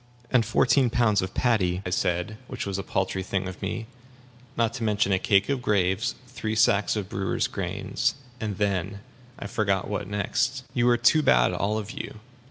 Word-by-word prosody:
"And 125 -3 +4
fourteen 130 +3 +3
pounds 110 -4 +2
of 95 +1 -5
paddy," 95 -7 +1
I 90 - -3
said 90 +4 -1
which 130 - -5
was 100 -1 -3
a - - -1
paltry 95 0 -1
thing 95 0 -2
of 95 - -8
me; 105 +3 -3 0.7
"not 115 -1 +1
to 115 - -4
mention 105 -2 +1
a 95 - +3
cake 100 +1 +3
of 140 -3 -1
graves, 105 +2 +1
three 110 -4 -4
sacks 110 -2 +3
of 105 -3 -3
brewers' 95 -1 -1
grains, - - -2 0.2
and 105 -4 -3
then 100 -1 -1 0.4
I - - -7
forget 100 -2 0
what 105 -2 -3
next." 105 +6 -1
"You 120 -1 +3
are 120 - +4
too 120 +7 +4
bad, - - +4
all 105 +2 0
of 110 0 -5
you. 140 -6 -7
105 Hz, 185 wpm, -26 LUFS, 95-115 Hz, 0.7 s, And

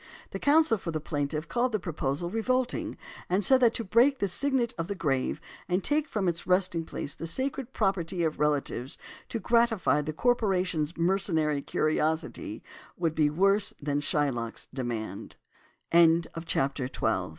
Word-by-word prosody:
The - - -5
counsel 295 -6 +4
for 170 - -6
the 160 -1 -2
plaintiff 150 +1 -3
called 245 0 0
the 215 - +1
proposal 160 -1 -3
"revolting," 250 +3 -1 0.3
and 190 +2 +2
said 265 -1 +6
that 235 -3 +4
to 230 - -1
break 240 +7 +4
the 200 - 0
signet 245 +5 +1
of 165 - -2
the 200 - -3
grave, 135 -7 -1 0.3
and 180 +1 0
take 300 +1 +1
from 210 -8 -2
its 170 -1 -1
resting 180 -3 +2
place 145 - -4
the 165 - -5
sacred 260 +6 -1
property 180 -5 -1
of 160 -1 -1
relatives 145 -3 -1 0.3
to - - -2
gratify 230 -9 +2
the 150 +1 -4
corporation's 185 -6 0
mercenary 165 -5 +1
curiosity, 155 +2 -1 0.3
would 165 -3 0
be 155 -2 +2
worse 195 +6 +2
than 145 0 -1
Shylock's 135 -6 -1
180 Hz, 140 wpm, -28 LUFS, 155-230 Hz, 0.3 s, said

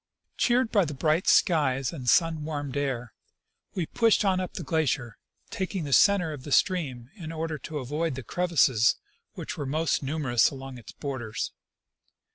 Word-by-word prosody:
Cheered 245 -1 +2
by 205 -3 +4
the 150 -2 -5
bright 155 +5 +1
skies 135 -5 +3
and 130 -6 -3
sun 165 -3 +3
warmed 145 -3 -4
air, 130 -5 -2 0.6
we 180 -4 -1
pushed 225 +3 +2
on 190 -2 +2
up 185 -2 -5
the - - -4
glacier, 145 - -1 0.3
taking 190 -4 -3
the 140 -2 -2
center 180 -4 +4
of 145 - -8
the 145 - -8
stream 135 -9 +1
in 165 -4 -7
order 160 -1 -4
to 155 +2 -6
avoid 150 +3 -2
the 130 - -6
crevasses, 145 -7 +3 0.4
which - - -6
were 145 - -3
most 155 +4 0
numerous 135 -4 +2
along 135 -2 -8
its 115 - -12
borders. 130 -6 -4
150 Hz, 165 wpm, -27 LUFS, 130-170 Hz, 0.6 s, by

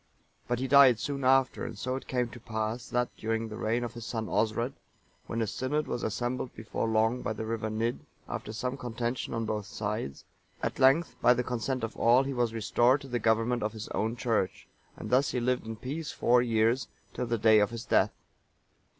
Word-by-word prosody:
But 120 - 0
he 130 +2 -2
died 135 -3 +7
soon 140 +3 -3
after,(930) 130 0 +3
and 110 - -8
so 130 +4 -2
it 135 - -6
came 125 -2 0
to 120 +2 -11
pass 110 +1 -3
that, 125 0 -1
during 115 0 -2
the 105 - -6
reign 115 +3 0
of 120 -2 -4
his 120 -1 -8
son 110 0 -3
Osred,(931) 110 +5 0 0.5
when 115 0 -1
a - - 0
synod 130 +8 -1
was 120 - -3
assembled 120 +3 -2
before 110 +1 -3
long 110 +2 +2
by - - -2
the 110 - -5
river 110 -1 -2
Nidd,(932) 115 +3 -1 0.3
after - - -5
some 125 +4 -3
contention 120 -1 -3
on 115 0 -1
both 105 -2 -3
sides, 105 -10 -4 0.4
at - - -2
length, 140 +5 +4
by 125 - +6
the 125 - 0
consent 125 +1 -2
of 115 - -3
all, 120 +3 +5
he 135 0 -3
was 120 -2 +1
restored 120 +4 +3
to 140 - -9
the 120 -2 -1
government 115 +2 +2
of 105 +1 -1
his 110 -1 -7
own 110 +2 -1
church;(933) 115 -5 -1 0.3
and - - -6
thus 130 +3 +4
he 125 - -1
lived 125 -1 0
in 115 - -4
peace 145 +7 -5
four 120 +1 +3
years, 115 +1 +2 0.3
till 125 - -3
the 115 0 0
day 110 0 +6
of 105 -1 +3
his 115 0 -7
death. - - +2
120 Hz, 210 wpm, -29 LUFS, 110-125 Hz, 0.5 s, died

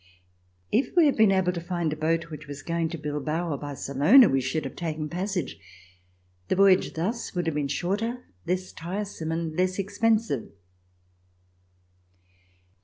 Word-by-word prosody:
If 255 +9 +1
we 345 -3 +6
had 285 - +3
been 220 -3 +5
able 190 -2 +2
to 170 - -4
find 170 -3 -2
a - - -4
boat 160 +1 -1
which 150 - -8
was 145 0 -8
going 165 -1 -1
to 165 - -5
Bilbao 150 +3 -2
or - - -2
Barcelona, 145 - +5
we 135 0 +2
should 130 +4 -2
have 135 - -6
taken 155 -3 -3
passage. 180 - -3 0.9
The - - +1
voyage 195 -1 +4
thus 205 +7 -3
would 175 -1 -1
have 165 - 0
been 145 -1 -1
shorter, 210 - -2 0.2
less 185 +1 -1
tiresome 175 -1 -5
and 165 -1 -2
less 185 +1 +1
expensive. 205 - 0
170 Hz, 155 wpm, -26 LUFS, 155-195 Hz, 0.9 s, we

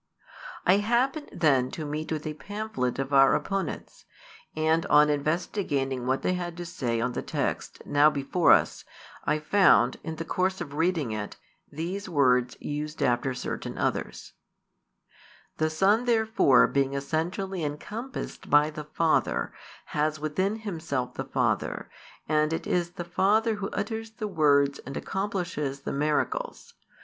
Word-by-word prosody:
I 185 +2 +5
happened 245 +8 0
then 135 -5 +2
to 155 - -4
meet 155 +2 -4
with 155 -1 -3
a 155 - -3
pamphlet 205 - -3
of 135 +1 -3
our 135 0 +6
opponents, 195 -4 -4 0.5
and 160 +1 +2
on 150 0 +6
investigating 145 -4 -1
what 130 +1 0
they 185 - +1
had 175 -1 -4
to 175 - -5
say 125 -10 -2
on 125 +2 0
the - - -3
text - - -3
now 145 +1 +5
before 150 +4 +2
us, - - +3 0.4
I 150 - +2
found, 155 -6 +4
in 160 -1 -4
the 165 +1 -5
course 185 +3 0
of 155 -5 -6
reading 160 -5 0
it, 110 -1 -5 0.3
these 185 +6 -4
words 125 -6 +2
used 150 +1 -4
after 125 +2 +1
certain - - -5
others: - - -3 1.2
"The 155 0 +1
Son 200 +9 +3
therefore 220 - +4
being 140 0 0
essentially 170 +6 -2
encompassed 210 - -6
by 150 +1 +5
the 150 0 -7
Father, 160 +2 0 0.4
has 155 +1 0
within 185 +7 -1
Himself 160 - -3
the - - -5
Father, - - -1 0.4
and 155 0 +2
it 165 - -2
is 175 -1 0
the 175 -2 -6
Father 210 +6 +2
Who 195 -1 -3
utters 225 +2 -4
the 215 -1 -4
words 145 -6 +3
and 135 +1 -7
accomplishes 180 -8 -3
the - - -4
miracles. 155 - -1
155 Hz, 145 wpm, -27 LUFS, 140-190 Hz, 1.2 s, our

